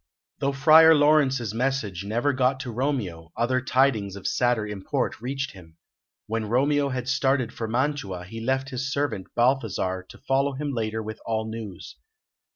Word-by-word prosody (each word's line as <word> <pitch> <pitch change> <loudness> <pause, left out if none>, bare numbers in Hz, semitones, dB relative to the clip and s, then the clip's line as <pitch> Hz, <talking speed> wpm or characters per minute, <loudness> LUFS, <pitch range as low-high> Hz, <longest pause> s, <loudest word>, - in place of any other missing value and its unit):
Though 140 - +1
Friar 160 +4 +7
Laurence's 140 -7 +3
message 115 -7 -1
never 120 +8 0
got 130 0 +1
to 125 - -5
Romeo, 110 - -3
other 125 +2 +1
tidings 125 -7 +1
of 100 - -10
sadder 120 -3 +1
import 105 +1 -3
reached 135 +3 -3
him. 85 -4 -15 0.5
When 110 -1 -3
Romeo 140 +4 +2
had 130 -1 -4
started 130 -2 +1
for 115 - -4
Mantua, 120 -7 -1
he 115 +5 -8
left 130 +3 -1
his 130 +1 -3
servant, 140 -10 -2
Balthasar, 110 -7 +1
to - - -12
follow 135 +1 0
him 145 +2 -3
later 110 -2 -2
with 110 0 -7
all 110 -1 -2
news. 110 -4 -8
125 Hz, 160 wpm, -25 LUFS, 110-135 Hz, 0.5 s, Friar